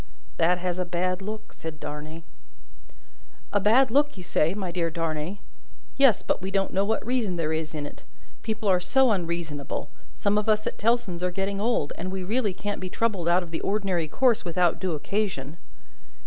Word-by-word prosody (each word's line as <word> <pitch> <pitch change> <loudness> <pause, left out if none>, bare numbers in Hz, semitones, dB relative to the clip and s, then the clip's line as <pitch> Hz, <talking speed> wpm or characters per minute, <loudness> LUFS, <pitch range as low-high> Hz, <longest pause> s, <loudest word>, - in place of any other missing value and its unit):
"That 175 +2 +4
has 180 0 -2
a - - +2
bad 180 +1 -1
look," 215 +2 -6
said 160 -2 -7
Darnay 155 +2 -7 1.3
"A 205 - +4
bad 230 +5 +5
look, 290 -1 +3
you 185 - -7
say, 170 0 +1
my 190 -4 -3
dear 170 -1 0
Darnay? 165 +2 -2 0.6
Yes, 270 -6 +5
but - - 0
we 190 - -3
don't 195 0 0
know 195 - +3
what 220 +2 0
reason 235 -6 0
there 160 -2 0
is 160 0 -3
in 150 -1 -3
it. - - -9 0.4
People 220 -1 -3
are 185 -2 +5
so 265 +6 +4
unreasonable! 170 -7 -3 0.2
Some 205 +1 +2
of 210 - -2
us 215 0 +3
at - - -3
Tellson's 215 -6 +1
are 180 - +2
getting 195 +2 -2
old, 220 -10 +1
and 185 +2 -3
we 190 -1 -3
really 215 +2 +1
can't 205 +2 -4
be 185 - -4
troubled 200 -5 -1
out 175 +2 +4
of 170 - -11
the 165 - -3
ordinary 195 -5 0
course 245 - +3
without 175 0 +2
due 185 -4 -1
occasion." 160 -4 -2
185 Hz, 190 wpm, -26 LUFS, 170-210 Hz, 1.3 s, bad